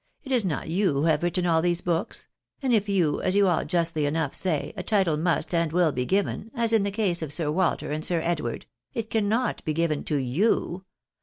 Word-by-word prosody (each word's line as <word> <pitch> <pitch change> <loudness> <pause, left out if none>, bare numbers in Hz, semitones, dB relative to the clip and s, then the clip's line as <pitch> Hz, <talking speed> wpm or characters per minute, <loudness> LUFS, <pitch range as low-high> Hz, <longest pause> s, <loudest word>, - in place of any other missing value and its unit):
It 270 - -8
is 245 -4 +3
not 165 -6 -2
you 185 +1 +1
who 140 +1 0
have 160 -2 +2
written 175 +1 0
aU 165 -2 +3
these 175 0 0
books; 175 +5 -2 0.3
and 265 -4 0
if, 210 -2 +2
as 185 0 +1
you 200 -1 +4
aU 175 -3 +2
justly 165 -2 0
enough 150 -1 -1
say, 165 -6 -2
a 190 - -4
title 190 -5 +1
must 170 +3 -1
and 165 -2 +1
will 175 -1 +3
be 125 -2 -2
given, 200 +2 -1
as 230 -2 0
in 225 - +4
the 200 - 0
case 195 -4 -1
of 155 -3 -2
Sir 150 -1 +1
Walter 175 -2 0
and 155 +1 -3
Sir 170 0 +2
Edward, 160 -8 -2 0.3
it 225 -1 -4
cannot 225 +3 0
be 155 - -2
given 165 -2 0
to 150 - -1
you. 175 - 0
175 Hz, 220 wpm, -26 LUFS, 155-200 Hz, 0.3 s, you